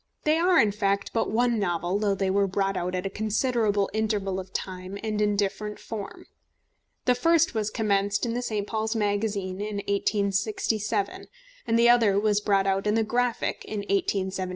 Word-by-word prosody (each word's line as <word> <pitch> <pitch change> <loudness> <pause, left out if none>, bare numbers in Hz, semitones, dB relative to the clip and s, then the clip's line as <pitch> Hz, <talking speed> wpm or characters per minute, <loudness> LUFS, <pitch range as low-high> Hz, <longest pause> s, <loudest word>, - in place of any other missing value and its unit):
They 305 +1 +3
are, 355 0 +4
in 210 - +4
fact, 200 -1 -1
but 225 - 0
one 235 +1 +1
novel, 175 0 -1
though 205 -2 +1
they 195 -1 0
were 200 0 +2
brought 195 +1 -1
out 180 0 -2
at 180 +1 -3
a - - -1
considerable 215 -2 +1
interval 210 -3 -1
of 190 0 -8
time 185 +1 -5
and 215 -1 -1
in 210 -1 +2
different 210 +1 -2
form. 210 -3 -7 0.8
The 250 - +5
first 330 +6 +3
was 215 -2 -1
commenced 205 -1 0
in 230 - -2
the 245 - -2
St. 215 -4 -2
Paul's 220 +1 -2
Magazine 205 -2 -1
in 210 0 -4
1867, 205 - -1 0.4
and 230 0 +2
the 235 +1 +5
other 225 -5 +4
was 210 0 +2
brought 195 -2 +2
out 195 +1 0
in 210 - +2
the 225 - +2
Graphic 240 +2 -1
in 210 -1 -4
1873. 195 -1 -1
205 Hz, 180 wpm, -26 LUFS, 195-220 Hz, 0.8 s, The